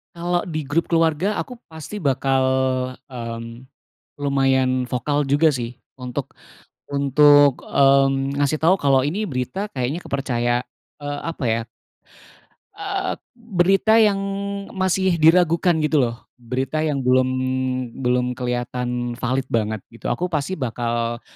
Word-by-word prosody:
Kalau 175 Hz, +2 st, -1 dB
di 155 Hz, -4 st, -3 dB
grup 150 Hz, +4 st, 0 dB
keluarga 165 Hz, +4 st, +1 dB
aku 250 Hz, -, -9 dB
pasti 160 Hz, +5 st, -8 dB
bakal, 135 Hz, -4 st, +1 dB, 0.7 s
mmm, 115 Hz, 0 st, -7 dB, 0.6 s
lumayan 130 Hz, -2 st, +2 dB
vokal 145 Hz, +4 st, -1 dB
juga 145 Hz, +4 st, +4 dB
sih 120 Hz, -4 st, -3 dB, 0.2 s
untuk 125 Hz, +2 st, -6 dB, 0.6 s
untuk, 145 Hz, 0 st, +5 dB
mmm, 135 Hz, 0 st, +3 dB
ngasih 145 Hz, +2 st, 0 dB
tahu 170 Hz, +4 st, +4 dB
kalau 140 Hz, -6 st, +3 dB
ini 205 Hz, +8 st, -2 dB
berita 175 Hz, -, -4 dB
kayaknya 130 Hz, +4 st, -2 dB
kepercaya 120 Hz, -3 st, 0 dB, 0.4 s
eee, 145 Hz, 0 st, -4 dB
apa 165 Hz, -4 st, -4 dB
ya 115 Hz, +1 st, +1 dB, 1.1 s
Eee, 395 Hz, -1 st, -3 dB, 0.2 s
berita 210 Hz, 0 st, +3 dB
yang 210 Hz, -2 st, +4 dB, 0.6 s
masih 190 Hz, -2 st, +1 dB
diragukan 170 Hz, +1 st, +4 dB
gitu 155 Hz, -1 st, +2 dB
loh. 115 Hz, -1 st, -3 dB, 0.2 s
Berita 130 Hz, +6 st, -2 dB
yang 145 Hz, -4 st, -1 dB
belum 130 Hz, 0 st, +3 dB, 0.7 s
belum 125 Hz, 0 st, +1 dB
kelihatan 125 Hz, 0 st, -3 dB
valid 130 Hz, +2 st, -1 dB
banget 110 Hz, -2 st, -1 dB
gitu, 115 Hz, -, -5 dB
aku 180 Hz, -, -1 dB
pasti 170 Hz, +2 st, -2 dB
bakal 120 Hz, -1 st, -2 dB
140 Hz, 120 wpm, -22 LUFS, 125-165 Hz, 1.1 s, untuk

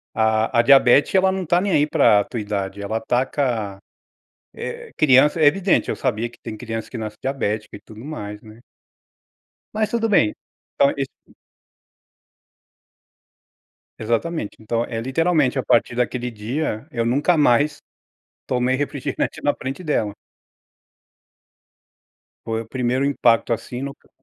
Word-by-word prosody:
a 110 Hz, +1 st, +2 dB
a -, -, +8 dB
diabete, 135 Hz, +6 st, +5 dB
ela 190 Hz, 0 st, +4 dB
não 190 Hz, -1 st, -3 dB
tá 175 Hz, +2 st, +3 dB
nem 195 Hz, 0 st, -1 dB
aí 145 Hz, -, +4 dB
pra 105 Hz, -8 st, +4 dB
a -, -, -2 dB
tua 120 Hz, -, -6 dB
idade, 100 Hz, -1 st, -4 dB
ela 105 Hz, +2 st, -2 dB
ataca, 120 Hz, -4 st, -1 dB, 0.8 s
eh, 470 Hz, 0 st, -7 dB
criança", 150 Hz, +2 st, +4 dB
é 155 Hz, -, +5 dB
evidente, 190 Hz, +5 st, +2 dB
eu -, -, -2 dB
sabia 115 Hz, +3 st, -1 dB
que 120 Hz, -, -20 dB
tem 110 Hz, -, -6 dB
crianças, 115 Hz, -1 st, -5 dB
que 125 Hz, -, -6 dB
nasce 110 Hz, -1 st, -6 dB
diabética 110 Hz, -6 st, -2 dB
e -, -, -13 dB
tudo 110 Hz, +2 st, -13 dB
mais, 105 Hz, -9 st, -7 dB
né. 110 Hz, 0 st, -14 dB, 1.2 s
Mas 215 Hz, 0 st, 0 dB
tudo 230 Hz, -1 st, 0 dB
bem, 115 Hz, -, +3 dB, 0.5 s
então 140 Hz, -, +5 dB
esse 135 Hz, -1 st, -3 dB, 2.9 s
Exatamente, 115 Hz, +3 st, -2 dB
então, 115 Hz, +2 st, -1 dB
eh, 115 Hz, -1 st, -4 dB
literalmente, 140 Hz, +1 st, +1 dB
a -, -, 0 dB
partir 120 Hz, -, +2 dB
daquele 125 Hz, 0 st, -1 dB
dia, 115 Hz, +2 st, -3 dB
eu 115 Hz, -3 st, -1 dB
nunca 145 Hz, +8 st, +2 dB
mais 145 Hz, +1 st, +3 dB, 0.7 s
tomei 125 Hz, 0 st, +1 dB
refrigerante 140 Hz, -1 st, -3 dB
na 145 Hz, -, +2 dB
frente 135 Hz, +7 st, -6 dB
dela. 110 Hz, -, -1 dB, 2.3 s
Foi 115 Hz, 0 st, -2 dB
o 110 Hz, -, -17 dB
primeiro 125 Hz, +2 st, 0 dB
impacto, 120 Hz, -5 st, +2 dB
assim, 120 Hz, +2 st, -4 dB
no 140 Hz, 0 st, -5 dB
c -, -, -28 dB
125 Hz, 145 wpm, -21 LUFS, 110-145 Hz, 2.9 s, a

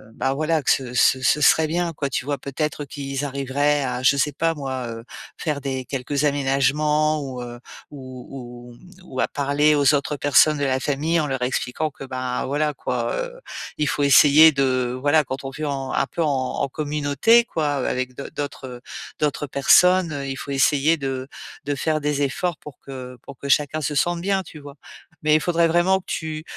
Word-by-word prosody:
bah, 135 Hz, -, 0 dB
voilà 155 Hz, +2 st, 0 dB
que -, -, -2 dB
ce 125 Hz, -2 st, -1 dB
ce 130 Hz, +1 st, +4 dB
ce 150 Hz, +4 st, +3 dB
serait 160 Hz, +2 st, +5 dB
bien 170 Hz, +1 st, -1 dB
quoi. 140 Hz, -1 st, -3 dB
Tu -, -, -2 dB
vois? 145 Hz, 0 st, -2 dB
Peut-être 150 Hz, +2 st, -4 dB
qu'ils 140 Hz, 0 st, -5 dB
arriveraient 140 Hz, +1 st, 0 dB
à 125 Hz, -1 st, -3 dB
je 140 Hz, +1 st, +4 dB
sais 145 Hz, +2 st, +1 dB
pas 165 Hz, +4 st, 0 dB
moi, 130 Hz, -5 st, -4 dB
heu, 115 Hz, 0 st, -7 dB, 0.3 s
faire 150 Hz, -4 st, -3 dB
des 130 Hz, -1 st, -3 dB
quelques 140 Hz, +2 st, -2 dB
aménagements 150 Hz, +2 st, +1 dB
ou 130 Hz, -2 st, -6 dB
heu, 120 Hz, 0 st, -8 dB, 0.3 s
ou 130 Hz, -3 st, -10 dB, 0.4 s
ou, 120 Hz, -, -13 dB
mmh, 180 Hz, +9 st, -18 dB
ou 130 Hz, -, -7 dB
à -, -, +2 dB
parler 145 Hz, +1 st, +2 dB
aux 145 Hz, 0 st, +4 dB
autres 145 Hz, +1 st, -1 dB
personnes 145 Hz, +2 st, +4 dB
de -, -, -1 dB
la 130 Hz, -1 st, +1 dB
famille 150 Hz, +5 st, 0 dB
en 155 Hz, -, 0 dB
leur 130 Hz, -2 st, -3 dB
expliquant 125 Hz, +4 st, -1 dB
que, 140 Hz, -, -11 dB
ben, 130 Hz, -1 st, -3 dB
voilà 150 Hz, +2 st, 0 dB
quoi, 120 Hz, -2 st, -2 dB
heu, -, -, -5 dB, 0.4 s
il 150 Hz, -, +1 dB
faut 145 Hz, -, 0 dB
essayer 150 Hz, +3 st, +7 dB
de, 130 Hz, -3 st, 0 dB
voilà 145 Hz, +2 st, +3 dB
quand 135 Hz, +1 st, -6 dB
on 135 Hz, -, -4 dB
vit 155 Hz, +3 st, -5 dB
en 135 Hz, -2 st, -3 dB
un -, -, +1 dB
peu 170 Hz, -, -4 dB
en 150 Hz, -, +1 dB, 0.3 s
en -, -, +1 dB
communauté 150 Hz, -, +2 dB
quoi 155 Hz, -8 st, -2 dB, 0.2 s
avec 130 Hz, 0 st, -2 dB
d'au 140 Hz, -, -7 dB
d'autres 130 Hz, -3 st, -6 dB, 0.4 s
d'autres 145 Hz, -1 st, -1 dB
personnes, 180 Hz, +5 st, +4 dB
heu, 140 Hz, -1 st, -4 dB
il 135 Hz, -, -3 dB
faut 140 Hz, -, -7 dB
essayer 145 Hz, +3 st, +3 dB
de 135 Hz, -2 st, -4 dB, 0.4 s
de 145 Hz, 0 st, -1 dB
faire 155 Hz, +2 st, 0 dB
des 145 Hz, -1 st, -1 dB
efforts 155 Hz, +5 st, -1 dB
pour 150 Hz, -, -12 dB
que 125 Hz, -2 st, -9 dB
pour 140 Hz, -2 st, -12 dB
que 140 Hz, -, -6 dB
chacun 150 Hz, +2 st, +2 dB
se 150 Hz, +1 st, -2 dB
sente 175 Hz, +4 st, +1 dB
bien. 195 Hz, +1 st, 0 dB
Tu 155 Hz, -, -12 dB
vois? 145 Hz, -1 st, -11 dB, 0.5 s
Mais 150 Hz, -, +3 dB
il 155 Hz, -, +3 dB
faudrait 170 Hz, 0 st, +2 dB
vraiment 175 Hz, +3 st, +3 dB
que -, -, -19 dB
tu 155 Hz, -1 st, -4 dB
145 Hz, 205 wpm, -22 LUFS, 135-155 Hz, 0.5 s, essayer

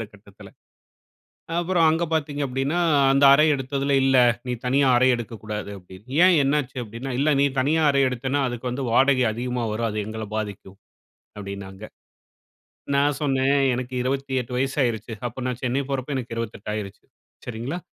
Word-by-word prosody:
அந்த -, -, -3 dB
கட்டத்தில. 100 Hz, -1 st, -15 dB, 1.1 s
அப்புறம் 175 Hz, -1 st, +2 dB
அங்க 165 Hz, +2 st, +1 dB
பார்த்தீங்க 145 Hz, -2 st, -1 dB
அப்டின்னா, 135 Hz, +6 st, -1 dB, 0.3 s
அந்த 135 Hz, +1 st, +3 dB
அறை 150 Hz, +2 st, +5 dB
எடுத்ததில 140 Hz, +1 st, -1 dB
இல்ல. 135 Hz, 0 st, +3 dB, 0.3 s
நீ 125 Hz, -, -1 dB
தனியா 135 Hz, +2 st, +3 dB
அறை 130 Hz, +1 st, +4 dB
எடுக்கக்கூடாது 110 Hz, -3 st, -6 dB
அப்டின்னு. 95 Hz, +4 st, -15 dB, 0.2 s
ஏன் 185 Hz, -1 st, +5 dB
என்ன 140 Hz, +2 st, +2 dB
ஆச்சு? 130 Hz, 0 st, -15 dB
அப்படீன்னா 115 Hz, +5 st, -7 dB
இல்ல 145 Hz, +2 st, +2 dB
நீ -, -, +5 dB
தனியா 155 Hz, +5 st, +2 dB
அறை 140 Hz, 0 st, +2 dB
எடுத்தன்னா, 130 Hz, +3 st, -2 dB
அதுக்கு 120 Hz, 0 st, -7 dB
வந்து 130 Hz, +2 st, -3 dB
வாடகை 130 Hz, +1 st, +4 dB
அதிகமா 125 Hz, +1 st, -3 dB
வரும். 115 Hz, +1 st, -1 dB
அது 105 Hz, -, -3 dB
எங்கள 110 Hz, 0 st, -5 dB
பாதிக்கும் 100 Hz, -3 st, -6 dB, 0.6 s
அப்டின்னாங்க. 100 Hz, 0 st, -8 dB, 1.1 s
நான் 140 Hz, -1 st, +2 dB
சொன்னேன் 135 Hz, 0 st, +2 dB, 0.2 s
எனக்கு 125 Hz, +1 st, -5 dB
28 130 Hz, -1 st, -2 dB
வயசாயிருச்சு. 125 Hz, -4 st, -1 dB, 0.2 s
அப்போ 120 Hz, -, -14 dB
நான் 125 Hz, -1 st, -3 dB
சென்னை 125 Hz, +2 st, 0 dB
போறப்போ 135 Hz, 0 st, -3 dB
எனக்கு 120 Hz, -3 st, -5 dB
28 115 Hz, -3 st, -6 dB
ஆயிருச்சு, 100 Hz, -2 st, -7 dB, 0.4 s
சரிங்களா? 125 Hz, +8 st, -4 dB
130 Hz, 155 wpm, -23 LUFS, 115-140 Hz, 1.1 s, அறை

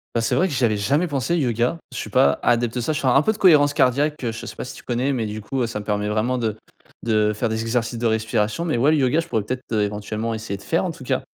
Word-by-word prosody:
Bah, 115 Hz, -, +2 dB
c'est -, -, 0 dB
vrai 185 Hz, -, +3 dB
que 160 Hz, -, -5 dB
j'avais 120 Hz, -5 st, +1 dB
jamais 145 Hz, -, +1 dB
pensé 140 Hz, +3 st, -1 dB
yoga, 125 Hz, +2 st, 0 dB
je -, -, -7 dB
suis -, -, -5 dB
pas 70 Hz, +1 st, +4 dB
adepte 120 Hz, -1 st, +2 dB
de 125 Hz, -, -1 dB
ça. 155 Hz, -, -1 dB
Je 155 Hz, -, -2 dB
fais 135 Hz, -, -1 dB
un 135 Hz, +3 st, +5 dB
peu 220 Hz, -, +2 dB
de -, -, -10 dB
cohérence 145 Hz, -6 st, +5 dB
cardiaque, 145 Hz, +2 st, +1 dB
heu, 115 Hz, -, -1 dB
je 110 Hz, -, -7 dB
sais -, -, -8 dB
pas -, -, -5 dB
si -, -, -8 dB
tu -, -, -13 dB
connais, 125 Hz, +3 st, -1 dB
mais 120 Hz, -4 st, -1 dB
du 105 Hz, 0 st, -5 dB
coup, 130 Hz, +6 st, -4 dB
heu, -, -, 0 dB
ça 115 Hz, -2 st, -4 dB
me 105 Hz, -, -9 dB
permet 105 Hz, 0 st, -1 dB
vraiment 110 Hz, +4 st, 0 dB
de 110 Hz, -3 st, -1 dB, 0.5 s
de 105 Hz, -2 st, +2 dB
faire 115 Hz, +2 st, -1 dB
des 110 Hz, 0 st, -2 dB
exercices 115 Hz, +1 st, -1 dB
de 120 Hz, -, -2 dB
respiration, 110 Hz, +5 st, 0 dB
mais 155 Hz, -8 st, 0 dB
ouais, 135 Hz, +6 st, +4 dB
le 155 Hz, -, +3 dB
yoga, 140 Hz, +4 st, +2 dB
je 165 Hz, -, -3 dB
pourrais 110 Hz, -10 st, 0 dB
peut-être, 125 Hz, +4 st, -4 dB
heu, 105 Hz, -, +2 dB
éventuellement, 105 Hz, +2 st, -3 dB
essayer 110 Hz, -3 st, -4 dB
de -, -, -16 dB
faire, 165 Hz, +3 st, 0 dB
en 180 Hz, -, -2 dB
tout 150 Hz, -, -11 dB
cas. -, -, -1 dB
120 Hz, 305 wpm, -22 LUFS, 110-140 Hz, 0.5 s, un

